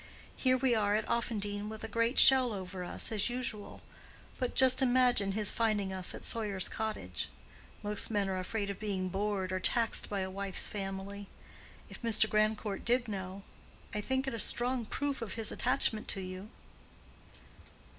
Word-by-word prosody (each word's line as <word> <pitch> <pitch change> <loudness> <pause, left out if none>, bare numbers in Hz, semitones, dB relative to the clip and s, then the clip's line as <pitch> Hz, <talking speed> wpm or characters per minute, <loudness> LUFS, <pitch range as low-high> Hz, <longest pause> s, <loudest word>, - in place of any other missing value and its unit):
Here 255 -1 +2
we 255 -1 +1
are 210 -2 +1
at 215 - -1
Offendene 210 -3 -2
with 220 0 -8
a - - -4
great 230 +3 0
shell 260 -3 +7
over 185 -1 -6
us, 175 - -1
as 215 0 0
usual. 240 -4 -5 0.6
But 250 - -2
just 260 0 +7
imagine 245 -6 +4
his 210 -1 +2
finding 210 -4 0
us 185 -1 -1
at - - -8
Sawyer's 205 -5 -1
Cottage. 95 - -4 0.5
Most 210 0 0
men 205 -3 0
are 190 -1 -2
afraid 200 +2 -3
of 195 - -9
being 195 -3 -3
bored 195 -1 -2
or 185 - -1
taxed 230 +4 +3
by 200 -2 -2
a 190 0 -4
wife's 195 0 +1
family. 195 0 -6 0.6
If - - -11
Mr. 225 -2 +3
Grandcourt 215 -1 -1
did 245 0 +1
know, 195 -1 -6 0.5
I 210 - -2
think 265 +4 -1
it 270 - -3
a 230 - -4
strong 245 +2 +1
proof 280 +3 -3
of 225 -4 -5
his 225 -2 -3
attachment 215 -1 0
to 195 - -2
you." 185 +2 -8
210 Hz, 170 wpm, -31 LUFS, 195-235 Hz, 0.6 s, shell